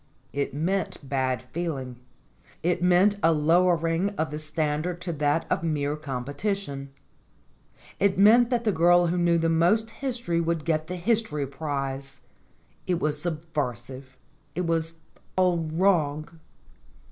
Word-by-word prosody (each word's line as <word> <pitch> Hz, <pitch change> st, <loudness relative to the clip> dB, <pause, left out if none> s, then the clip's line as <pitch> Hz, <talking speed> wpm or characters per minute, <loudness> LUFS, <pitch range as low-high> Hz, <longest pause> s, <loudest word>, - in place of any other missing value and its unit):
It 140 Hz, 0 st, -1 dB
meant 165 Hz, 0 st, -2 dB
bad 130 Hz, -2 st, -1 dB
feeling. 140 Hz, -7 st, -3 dB, 0.7 s
It 175 Hz, 0 st, +1 dB
meant 180 Hz, +3 st, +4 dB
a 165 Hz, -, +5 dB
lowering 165 Hz, +3 st, +2 dB
of 160 Hz, -1 st, -1 dB
the 150 Hz, -, -4 dB
standard 155 Hz, +2 st, -2 dB
to 175 Hz, -2 st, -3 dB
that 150 Hz, +2 st, +1 dB
of -, -, 0 dB
mere 150 Hz, -3 st, -1 dB
competition. 145 Hz, -, -4 dB, 1.1 s
It 195 Hz, -1 st, +2 dB
meant 230 Hz, +5 st, +6 dB
that 240 Hz, -2 st, 0 dB
the 215 Hz, -, +2 dB
girl 175 Hz, 0 st, +4 dB
who 175 Hz, +1 st, 0 dB
knew 170 Hz, -1 st, +3 dB
the 165 Hz, 0 st, +1 dB
most 175 Hz, +8 st, +2 dB
history 235 Hz, -12 st, -2 dB
would 165 Hz, -2 st, -1 dB
get 155 Hz, -1 st, 0 dB
the 180 Hz, -, -4 dB
history 180 Hz, -6 st, 0 dB
prize. 135 Hz, -1 st, -5 dB, 0.7 s
It 180 Hz, -2 st, +1 dB
was 150 Hz, -1 st, 0 dB
subversive. 135 Hz, -6 st, -4 dB, 0.4 s
It 180 Hz, -, -1 dB
was 165 Hz, 0 st, -1 dB, 0.4 s
all 180 Hz, -2 st, +3 dB
wrong. 160 Hz, -3 st, +1 dB
165 Hz, 135 wpm, -26 LUFS, 145-180 Hz, 1.1 s, meant